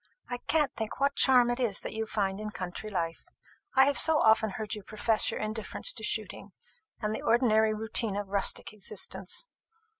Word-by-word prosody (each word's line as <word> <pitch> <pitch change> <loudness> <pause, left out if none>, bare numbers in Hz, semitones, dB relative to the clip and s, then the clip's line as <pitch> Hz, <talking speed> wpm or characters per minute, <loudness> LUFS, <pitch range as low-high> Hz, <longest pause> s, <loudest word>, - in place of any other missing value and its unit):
I 245 - -3
can't 300 +2 0
think 220 +1 -5
what 280 0 +2
charm 250 -2 +5
it 240 - -2
is 230 -6 +1
that - - -6
you 220 0 -3
find 200 -2 -1
in 215 0 -4
country 190 +1 -6
life. 170 -4 -3 0.5
I 265 0 +7
have 285 0 +3
so 320 -1 +5
often 220 -3 +4
heard 215 -1 -3
you 210 - -4
profess 215 +2 0
your - - -4
indifference 220 - -2
to - - -9
shooting, - - -4 0.5
and 210 -1 -2
the - - -5
ordinary 220 -2 +3
routine 220 -1 0
of 205 -1 -4
rustic 200 +1 0
existence. 195 - -3
220 Hz, 185 wpm, -29 LUFS, 205-240 Hz, 0.5 s, I